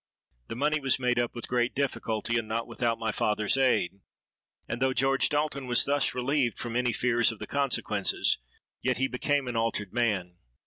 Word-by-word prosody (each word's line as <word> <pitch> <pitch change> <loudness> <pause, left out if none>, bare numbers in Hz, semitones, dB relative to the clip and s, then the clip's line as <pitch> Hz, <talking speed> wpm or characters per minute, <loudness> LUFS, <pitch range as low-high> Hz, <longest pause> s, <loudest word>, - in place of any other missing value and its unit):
The - - -5
money 150 +4 +1
was 135 -3 +2
made 125 -1 +1
up 120 - -3
with 120 - -6
great 120 0 0
difficulty, 120 -5 -1
and 110 - -6
not 115 +1 -2
without 115 -1 -1
my 115 -1 -1
father's 105 +1 +1
aid; 125 -8 +1 0.7
and 120 - -4
though 130 0 +2
George 135 +1 +2
Dalton 145 -3 -1
was 120 -1 +4
thus 140 -1 +1
relieved 125 -1 0
from 120 -1 -5
any 125 0 +2
fears 120 0 +2
of 115 - -9
the 105 - -6
consequences, 115 - 0 0.4
yet 130 0 0
he 135 - +1
became 140 +1 0
an 120 - -3
altered 115 -3 -1
man. 100 -7 0
120 Hz, 185 wpm, -28 LUFS, 115-135 Hz, 0.7 s, was